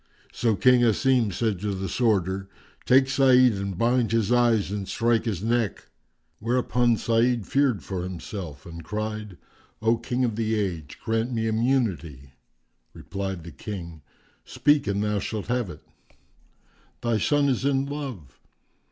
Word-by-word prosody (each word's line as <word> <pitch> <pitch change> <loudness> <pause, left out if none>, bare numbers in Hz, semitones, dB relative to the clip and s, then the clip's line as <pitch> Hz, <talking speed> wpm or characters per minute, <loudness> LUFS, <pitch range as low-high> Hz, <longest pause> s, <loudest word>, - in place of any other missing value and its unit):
So 115 -3 +1
King 125 +4 +5
Asim 120 -1 +3
said 105 0 -1
to 100 0 -2
the 95 0 -3
Sworder, 95 -5 0 0.4
"Take 130 +1 +5
Sa'id 130 -2 +5
and 100 -2 -4
bind 120 +1 +2
his 115 -1 +1
eyes 120 -5 +3
and 100 -2 -4
strike 115 -1 +1
his 100 -5 -2
neck." 115 -2 -1 0.5
Whereupon 120 0 +1
Sa'id 115 -1 +1
feared 135 -4 +1
for 95 -2 -4
himself 90 -4 -7
and 85 -1 -9
cried, 105 -1 -5 0.4
"O 115 +1 +2
King 125 +2 -1
of 115 -3 -3
the 110 -1 0
Age, 85 -8 -4
grant 115 +2 0
me 115 -2 -1
immunity." 110 - -1 0.6
Replied 95 -3 -5
the 85 - -9
King, 85 +1 -7 0.4
"Speak 145 -5 +2
and 100 0 0
thou 105 -1 0
shalt 105 +1 -4
have 125 -5 0
it." 75 - -11 1.2
"Thy 115 -2 0
son 145 +6 +2
is 130 -2 0
in 135 -1 +1
love." 135 - -7
110 Hz, 145 wpm, -25 LUFS, 95-125 Hz, 1.2 s, King